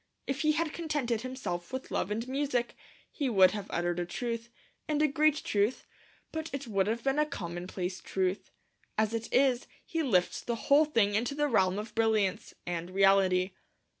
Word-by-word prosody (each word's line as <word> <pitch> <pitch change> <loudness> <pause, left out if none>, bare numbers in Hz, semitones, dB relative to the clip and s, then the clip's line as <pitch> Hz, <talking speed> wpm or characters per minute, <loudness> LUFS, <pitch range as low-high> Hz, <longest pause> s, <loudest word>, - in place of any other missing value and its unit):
If 275 +1 -2
he 305 0 +3
had 320 0 -1
contented 290 -9 -1
himself 250 -10 -5
with 260 0 -5
Love - - -1
and 225 +3 -2
Music, 260 -3 -1 0.4
he 280 -4 -1
would 190 -5 +6
have 205 -2 -5
uttered 175 0 -1
a 175 - -1
truth, 230 +4 -4 0.4
and 300 -1 0
a 305 - +4
great 305 +1 +2
truth; 205 +4 0 0.5
but 320 0 -4
it 275 0 -4
would 195 -4 +1
have 230 +2 -1
been 270 +2 +1
a 300 - +4
commonplace 180 - -5
truth. 190 +1 -1 0.5
As 220 0 +2
it 230 0 -3
is, 260 -1 +3 0.2
he 330 - -2
lifts 190 - +1
the 235 - -2
whole 285 +6 +4
thing 225 -9 +2
into 240 +7 0
the 295 0 +1
realm 190 -7 +2
of 210 +1 -5
brilliance 220 -4 +1
and 175 0 -3
reality. 190 -1 +4
230 Hz, 180 wpm, -30 LUFS, 190-275 Hz, 0.5 s, would